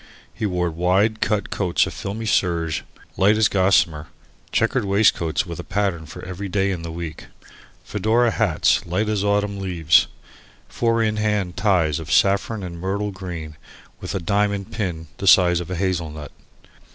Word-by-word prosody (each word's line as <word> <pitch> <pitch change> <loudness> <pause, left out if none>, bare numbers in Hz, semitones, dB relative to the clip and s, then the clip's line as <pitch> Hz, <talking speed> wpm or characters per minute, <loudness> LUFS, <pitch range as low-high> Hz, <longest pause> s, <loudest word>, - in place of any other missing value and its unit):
He 110 - -2
wore 90 -2 -1
wide 95 +6 +1
cut 105 -1 0
coats 90 -4 +1
of - - -6
filmy 110 +3 -5
serge, 85 -6 0 0.3
light 105 +3 +4
as 110 -1 +4
gossamer; 95 -6 +2 0.4
chequered - - +1
waistcoats 95 -3 +2
with 85 -1 -7
a - - -5
pattern 95 -5 -2
for 80 - -9
every 95 +2 -6
day 95 +1 +1
in 90 -3 -4
the 85 0 -6
week; 80 -2 -7 0.6
fedora 115 +2 +1
hats 105 -9 +2
light 95 +5 0
as 105 -2 0
autumn 100 0 0
leaves; 90 -5 +3 0.6
four 115 -1 +1
in 110 -1 0
hand 105 -4 -1
ties 85 -8 +1
of 80 -2 -7
saffron 100 +4 +2
and 85 -2 -7
myrtle 100 +3 -2
green 85 -6 -7 0.4
with - - -5
a - - 0
diamond 100 +1 -1
pin 90 -6 -3
the 100 - -4
size 90 -2 +6
of 85 0 -6
a 90 - -3
hazel 90 -3 -1
nut. 75 -1 -9
95 Hz, 165 wpm, -22 LUFS, 85-105 Hz, 0.6 s, size